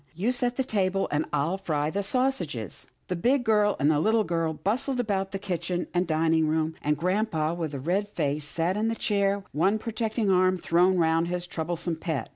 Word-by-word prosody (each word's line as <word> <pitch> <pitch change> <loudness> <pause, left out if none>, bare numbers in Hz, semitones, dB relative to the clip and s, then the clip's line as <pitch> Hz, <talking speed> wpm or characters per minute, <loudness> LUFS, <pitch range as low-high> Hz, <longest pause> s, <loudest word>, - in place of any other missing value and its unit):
You 205 +9 +1
set 245 -1 0
the 265 - 0
table, 195 -6 0
and 150 +1 +1
I'll 165 +7 0
fry 155 -5 -1
the 200 - -1
sausages." 190 - -2 0.2
The 180 - -2
big 245 +9 +2
girl 210 -2 +3
and 145 +2 +4
the 150 - +2
little 220 +6 +3
girl 165 -3 -1
bustled 245 - -1
about 195 -5 -1
the 195 - -2
kitchen 180 -2 -3
and 180 0 +1
dining 160 0 +2
room, 160 +1 0
and 150 0 +1
grampa, 175 -2 0
with 160 -4 -4
a - - -4
red 185 +9 -1
face, 150 -5 -2
sat 165 +5 -1
in 220 +1 +1
his 230 - -2
chair, 200 -1 +1
one 190 +8 +2
protecting 220 -1 -1
arm 185 0 +3
thrown 180 +2 +3
round 165 0 +2
his 180 0 -2
troublesome 170 0 -3
pet. 160 -7 -3
180 Hz, 200 wpm, -27 LUFS, 160-205 Hz, 0.2 s, and